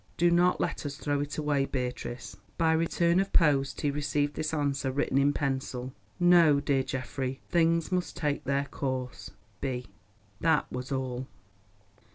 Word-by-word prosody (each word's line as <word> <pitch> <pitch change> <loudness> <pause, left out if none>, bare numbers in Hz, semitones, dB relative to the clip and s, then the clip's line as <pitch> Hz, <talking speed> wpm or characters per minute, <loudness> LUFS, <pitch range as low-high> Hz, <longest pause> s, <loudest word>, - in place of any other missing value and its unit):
Do 175 +1 +4
not 175 +1 +3
let - - -2
us 145 -2 -4
throw 145 -1 -1
it 145 0 -4
away, 145 -2 +1
Beatrice." 125 -5 -4 0.2
By 160 -1 +3
return 170 +2 +2
of 195 0 0
post 140 -5 +3
he 145 - +1
received 145 0 0
this 155 - -2
answer 140 -3 0
written 135 0 +1
in 140 +1 +4
pencil. 130 -2 -3 0.3
"No, 170 -5 +6
dear 140 -1 +1
Geoffrey. 130 0 -4
Things 165 0 +2
must 180 -1 -1
take 145 -3 -1
their 140 +1 +1
course.—B." 125 -2 -5 0.5
That 160 -2 +2
was 125 +2 -5
all. 130 -1 -3
140 Hz, 150 wpm, -29 LUFS, 130-160 Hz, 0.5 s, No